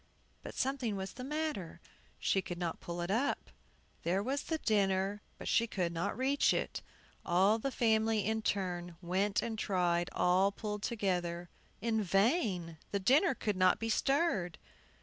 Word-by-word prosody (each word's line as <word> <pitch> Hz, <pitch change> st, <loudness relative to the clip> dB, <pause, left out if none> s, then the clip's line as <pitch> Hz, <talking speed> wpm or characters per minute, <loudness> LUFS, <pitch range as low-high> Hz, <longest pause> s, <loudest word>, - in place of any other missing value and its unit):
But -, -, -8 dB
something 255 Hz, -5 st, -1 dB
was 190 Hz, 0 st, -5 dB
the 250 Hz, -, -7 dB
matter; 300 Hz, -, -3 dB, 0.4 s
she 195 Hz, -, +1 dB
could 175 Hz, -1 st, -6 dB
not 170 Hz, -2 st, -3 dB
pull 175 Hz, 0 st, -5 dB
it 175 Hz, +2 st, -2 dB
up. 250 Hz, +7 st, 0 dB, 0.5 s
There 185 Hz, +4 st, 0 dB
was 275 Hz, +5 st, -1 dB
the 320 Hz, -, -2 dB
dinner, 200 Hz, -4 st, +1 dB, 0.2 s
but -, -, -7 dB
she 230 Hz, -, +3 dB
could 175 Hz, -5 st, -1 dB
not 170 Hz, +5 st, -2 dB
reach 270 Hz, +3 st, +3 dB
it. -, -, -2 dB, 0.4 s
All 195 Hz, +6 st, +3 dB
the 275 Hz, -, -1 dB
family, 220 Hz, -3 st, +2 dB
in 220 Hz, +1 st, 0 dB
turn, 175 Hz, -5 st, -2 dB
went 190 Hz, +3 st, 0 dB
and 225 Hz, -2 st, -3 dB
tried; 175 Hz, -4 st, +1 dB
all 185 Hz, +3 st, +3 dB
pulled 210 Hz, 0 st, -4 dB
together, 175 Hz, -6 st, -1 dB, 0.3 s
in 220 Hz, 0 st, +1 dB
vain; 195 Hz, -, +1 dB
the 200 Hz, -, -1 dB
dinner 270 Hz, -, +4 dB
could 210 Hz, -3 st, -1 dB
not 185 Hz, -1 st, +4 dB
be 225 Hz, -, -3 dB
stirred. 270 Hz, -, +1 dB
200 Hz, 160 wpm, -33 LUFS, 180-230 Hz, 0.5 s, dinner